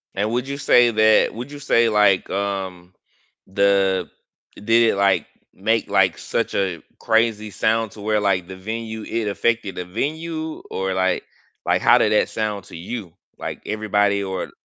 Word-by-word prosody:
And 105 Hz, +3 st, -1 dB
would 125 Hz, +2 st, -1 dB
you 140 Hz, 0 st, -4 dB
say 120 Hz, -4 st, +4 dB
that 110 Hz, 0 st, +4 dB
would 125 Hz, +5 st, -7 dB
you 145 Hz, -, -8 dB
say 115 Hz, -4 st, +3 dB
like, 105 Hz, -3 st, +3 dB
um, 95 Hz, -2 st, -4 dB, 0.5 s
the 95 Hz, -2 st, +2 dB, 0.5 s
did 115 Hz, +2 st, +3 dB
it, -, -, -2 dB
like, 95 Hz, -4 st, +2 dB, 0.3 s
make, 110 Hz, +4 st, 0 dB
like, -, -, +3 dB
such -, -, -2 dB
a 90 Hz, -5 st, -1 dB, 0.2 s
crazy 110 Hz, -2 st, +1 dB
sound 110 Hz, +1 st, 0 dB
to 105 Hz, -, -12 dB
where, 105 Hz, 0 st, +1 dB
like, 95 Hz, -3 st, 0 dB
the 95 Hz, -, -8 dB
venue, 110 Hz, +2 st, -5 dB
it 115 Hz, -2 st, -3 dB
affected 110 Hz, 0 st, -1 dB
the 90 Hz, -, -5 dB
venue, 155 Hz, -, -4 dB
Or 95 Hz, 0 st, -2 dB
like 95 Hz, -1 st, 0 dB, 0.4 s
like -, -, +2 dB
how -, -, +6 dB
did -, -, +2 dB
that -, -, +2 dB
sound 105 Hz, -3 st, -3 dB
to -, -, -12 dB
you? 90 Hz, -1 st, -6 dB, 0.2 s
Like -, -, -6 dB
everybody 105 Hz, -1 st, +1 dB
or 95 Hz, -1 st, -4 dB
105 Hz, 170 wpm, -21 LUFS, 95-115 Hz, 0.5 s, how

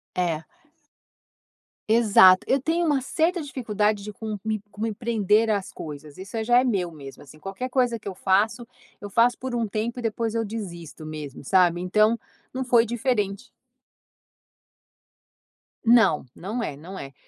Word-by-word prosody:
É. 165 Hz, -3 st, -1 dB, 1.4 s
Exato, 205 Hz, -5 st, +7 dB
eu 270 Hz, -, +3 dB
tenho 335 Hz, +4 st, 0 dB
uma 290 Hz, -3 st, +2 dB
certa 325 Hz, +6 st, 0 dB
dificuldade 215 Hz, -7 st, -1 dB
de 210 Hz, -, -6 dB
co 215 Hz, 0 st, -5 dB
de 220 Hz, -1 st, -1 dB
co 205 Hz, -, -11 dB
me 225 Hz, -1 st, -1 dB
prender 220 Hz, -1 st, +1 dB
as 200 Hz, -3 st, -1 dB
coisas, 150 Hz, -1 st, -9 dB
isso 190 Hz, +4 st, -9 dB
aí 220 Hz, -, -1 dB
já 240 Hz, +2 st, +5 dB
é -, -, +2 dB
meu 190 Hz, -8 st, 0 dB
mesmo, 140 Hz, -4 st, -11 dB
assim, 150 Hz, +2 st, -16 dB
qualquer 195 Hz, +9 st, -5 dB
coisa 245 Hz, -2 st, +1 dB
que 220 Hz, -, -22 dB
eu -, -, -6 dB
faço, 205 Hz, +6 st, +1 dB, 0.3 s
eu 205 Hz, -, -8 dB
faço 235 Hz, +4 st, +3 dB
por 260 Hz, -1 st, -4 dB
um 235 Hz, -1 st, 0 dB
tempo 220 Hz, +4 st, -3 dB
e -, -, -4 dB
depois 225 Hz, 0 st, -2 dB
eu 230 Hz, -, +1 dB
desisto 175 Hz, -8 st, -7 dB
mesmo, 150 Hz, -3 st, -8 dB
sabe, 175 Hz, +1 st, +3 dB
então, 215 Hz, +5 st, +2 dB, 0.3 s
não 260 Hz, 0 st, -3 dB
foi 240 Hz, -2 st, +4 dB
diferente. 230 Hz, -2 st, -2 dB, 2.3 s
Não, 225 Hz, -, +5 dB
não 215 Hz, +7 st, -4 dB
é, 150 Hz, -, -3 dB
não 175 Hz, +7 st, -10 dB
é. 135 Hz, 0 st, -8 dB
215 Hz, 165 wpm, -25 LUFS, 185-235 Hz, 2.3 s, Exato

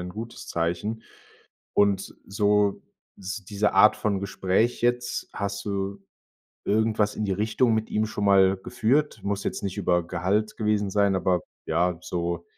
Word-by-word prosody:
'n 90 Hz, 0 st, -5 dB
gutes 115 Hz, +4 st, -8 dB
Zeichen. 85 Hz, +7 st, -2 dB, 0.7 s
Und 100 Hz, -2 st, +3 dB
s -, -, -10 dB
so 105 Hz, 0 st, +2 dB, 0.3 s
s 100 Hz, +2 st, -6 dB
diese 100 Hz, +2 st, 0 dB
Art 105 Hz, -, +6 dB
von 100 Hz, -3 st, -1 dB
Gespräch 100 Hz, +4 st, 0 dB
jetzt, 120 Hz, 0 st, 0 dB
hast 100 Hz, 0 st, -4 dB
du 100 Hz, -1 st, -3 dB, 0.7 s
irgendwas 110 Hz, -1 st, +1 dB
in 110 Hz, -, -2 dB
die 100 Hz, -, -2 dB
Richtung 110 Hz, +4 st, +1 dB
mit 110 Hz, 0 st, -1 dB
ihm 110 Hz, +1 st, +1 dB
schon 105 Hz, -1 st, -4 dB
mal 95 Hz, -1 st, +5 dB
geführt? 125 Hz, +5 st, 0 dB
Muss 100 Hz, 0 st, -2 dB
jetzt -, -, -3 dB
nicht 100 Hz, -1 st, -3 dB
über 90 Hz, -2 st, +1 dB
Gehalt 100 Hz, +6 st, -1 dB
gewesen 105 Hz, -2 st, 0 dB
sein, 100 Hz, 0 st, +2 dB
aber, 95 Hz, -1 st, +1 dB, 0.2 s
ja, 85 Hz, +2 st, +1 dB
so 85 Hz, -1 st, -3 dB
100 Hz, 155 wpm, -26 LUFS, 95-110 Hz, 0.7 s, Art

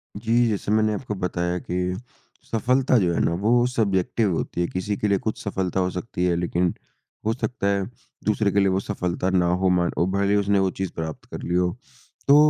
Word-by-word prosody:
जी। 115 Hz, +3 st, +2 dB
जैसे 105 Hz, -1 st, -1 dB
मैंने 110 Hz, 0 st, +3 dB
आपको 105 Hz, -1 st, -4 dB
बताया 90 Hz, 0 st, -1 dB
कि 90 Hz, +1 st, -2 dB, 0.6 s
सफलता 125 Hz, +3 st, +3 dB
जो 90 Hz, -5 st, +2 dB
है -, -, 0 dB
ना, -, -, +2 dB
वो 115 Hz, +7 st, +3 dB
सब्ज़ेक्टिव 105 Hz, -3 st, +1 dB
होती 85 Hz, -, -2 dB
हैं। 85 Hz, -, 0 dB
किसी 95 Hz, +3 st, -2 dB
के 105 Hz, -, 0 dB
लिए 100 Hz, -, +3 dB
कुछ 110 Hz, -, -3 dB
सफलता 95 Hz, -2 st, -1 dB
हो 90 Hz, 0 st, +1 dB
सकती 90 Hz, -1 st, -3 dB
है 90 Hz, -1 st, +2 dB
लेकिन 85 Hz, 0 st, 0 dB, 0.5 s
हो 110 Hz, -, +2 dB
सकता 125 Hz, -4 st, -2 dB
है 100 Hz, -1 st, +1 dB, 0.4 s
दूसरे 105 Hz, -1 st, +2 dB
के 100 Hz, -, +2 dB
लिए 100 Hz, -, +4 dB
वो 95 Hz, -, +1 dB
सफलता 90 Hz, -2 st, -2 dB
ना 90 Hz, -2 st, +3 dB, 0.2 s
हो 95 Hz, -, +4 dB
मान 85 Hz, -, +1 dB
वो 85 Hz, -, +3 dB
भले 100 Hz, +1 st, +1 dB
ही -, -, +4 dB
उसने 100 Hz, 0 st, +2 dB
वो 95 Hz, -1 st, +2 dB
चीज़ 95 Hz, -2 st, -2 dB
प्राप्त 80 Hz, -1 st, -5 dB
कर -, -, -6 dB
ली 85 Hz, -, -2 dB
हो। 90 Hz, 0 st, +2 dB, 0.6 s
तो 140 Hz, -, +8 dB
95 Hz, 215 wpm, -24 LUFS, 90-110 Hz, 0.6 s, तो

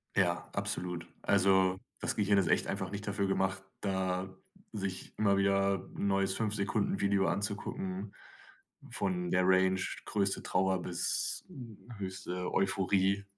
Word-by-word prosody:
Ja, 90 Hz, -3 st, +1 dB
absolut, 85 Hz, -1 st, -3 dB
also, 95 Hz, -1 st, +4 dB, 0.2 s
das -, -, -1 dB
Gehirn 100 Hz, -1 st, +3 dB
ist 95 Hz, -, +3 dB
echt -, -, +2 dB
einfach -, -, -3 dB
nicht 100 Hz, +1 st, -5 dB
dafür 100 Hz, -1 st, 0 dB
gemacht, 95 Hz, 0 st, 0 dB, 0.2 s
da 95 Hz, -2 st, -1 dB, 0.5 s
sich 95 Hz, -3 st, -4 dB
immer 100 Hz, -2 st, +3 dB
wieder 100 Hz, -1 st, +2 dB
neues 95 Hz, -1 st, +1 dB
5 110 Hz, -2 st, -1 dB
Sekunden 100 Hz, -1 st, 0 dB
Video 100 Hz, -1 st, +2 dB
anzugucken, 180 Hz, -, -3 dB, 0.8 s
von 180 Hz, -1 st, -1 dB
der 90 Hz, 0 st, +3 dB
Range 95 Hz, 0 st, +4 dB, 0.3 s
größte 100 Hz, -2 st, 0 dB
Trauer 95 Hz, 0 st, +1 dB
bis, 90 Hz, 0 st, -1 dB
hm, 120 Hz, -, -11 dB
höchste 95 Hz, -2 st, -4 dB
Euphorie. 95 Hz, 0 st, +2 dB
95 Hz, 130 wpm, -32 LUFS, 95-100 Hz, 0.8 s, also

